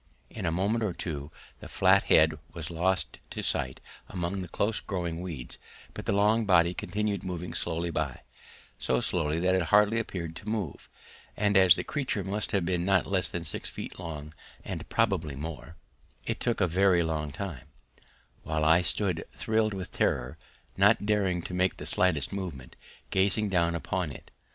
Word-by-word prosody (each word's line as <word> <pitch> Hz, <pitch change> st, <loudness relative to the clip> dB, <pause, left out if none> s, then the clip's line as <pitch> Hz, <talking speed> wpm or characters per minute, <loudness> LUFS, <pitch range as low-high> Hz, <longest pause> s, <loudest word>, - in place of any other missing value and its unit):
In -, -, -4 dB
a -, -, +1 dB
moment 100 Hz, +7 st, +1 dB
or 100 Hz, -5 st, 0 dB
two 75 Hz, -4 st, -5 dB, 0.3 s
the -, -, -9 dB
flat -, -, +4 dB
head 80 Hz, -1 st, +5 dB
was 85 Hz, -1 st, -5 dB
lost 85 Hz, 0 st, 0 dB
to -, -, -4 dB
sight 65 Hz, 0 st, +1 dB, 0.3 s
among 90 Hz, +1 st, -3 dB
the 90 Hz, -, -5 dB
close 105 Hz, +5 st, 0 dB
growing 85 Hz, -4 st, -3 dB
weeds, 80 Hz, -9 st, -6 dB, 0.3 s
but -, -, -7 dB
the -, -, +2 dB
long 105 Hz, +3 st, +3 dB
body 85 Hz, -2 st, +5 dB
continued 105 Hz, 0 st, -2 dB
moving 90 Hz, -2 st, -4 dB
slowly 85 Hz, 0 st, -2 dB
by 75 Hz, -5 st, -2 dB, 0.6 s
so 65 Hz, -, +1 dB
slowly 75 Hz, +5 st, +1 dB
that 90 Hz, +1 st, +2 dB
it 95 Hz, -, +3 dB
hardly 105 Hz, +6 st, +4 dB
appeared 85 Hz, -7 st, -4 dB
to 105 Hz, -, -7 dB
move, 105 Hz, -10 st, -3 dB, 0.5 s
and 105 Hz, 0 st, +2 dB
as 95 Hz, -2 st, +8 dB
the -, -, -3 dB
creature 130 Hz, -9 st, -2 dB
must 100 Hz, +3 st, -2 dB
have 100 Hz, -5 st, +1 dB
been 90 Hz, -1 st, 0 dB
not 95 Hz, 0 st, +3 dB
less 95 Hz, -2 st, +1 dB
than 85 Hz, -, -4 dB
six 80 Hz, -, -4 dB
feet -, -, -8 dB
long, 75 Hz, -3 st, -6 dB, 0.3 s
and -, -, -5 dB
probably 75 Hz, -4 st, +1 dB
more, 80 Hz, +2 st, -7 dB, 0.5 s
it -, -, -2 dB
took 120 Hz, -3 st, 0 dB
a -, -, +5 dB
very 90 Hz, 0 st, +3 dB
long 80 Hz, -2 st, -2 dB
time, 75 Hz, -2 st, -6 dB, 0.7 s
while 80 Hz, 0 st, -1 dB
I 80 Hz, +3 st, +6 dB
stood 90 Hz, -2 st, 0 dB
thrilled 110 Hz, -2 st, +1 dB
with 95 Hz, -2 st, -6 dB
terror, -, -, 0 dB, 0.4 s
not 100 Hz, +2 st, +4 dB
daring 95 Hz, -5 st, +1 dB
to -, -, -6 dB
make 90 Hz, +1 st, +1 dB
the -, -, -7 dB
slightest 85 Hz, -3 st, +2 dB
movement, 80 Hz, -11 st, -6 dB, 0.4 s
gazing 100 Hz, +2 st, +2 dB
down 85 Hz, -3 st, +2 dB
upon 85 Hz, -1 st, -2 dB
it. -, -, -12 dB
90 Hz, 175 wpm, -29 LUFS, 80-100 Hz, 0.7 s, as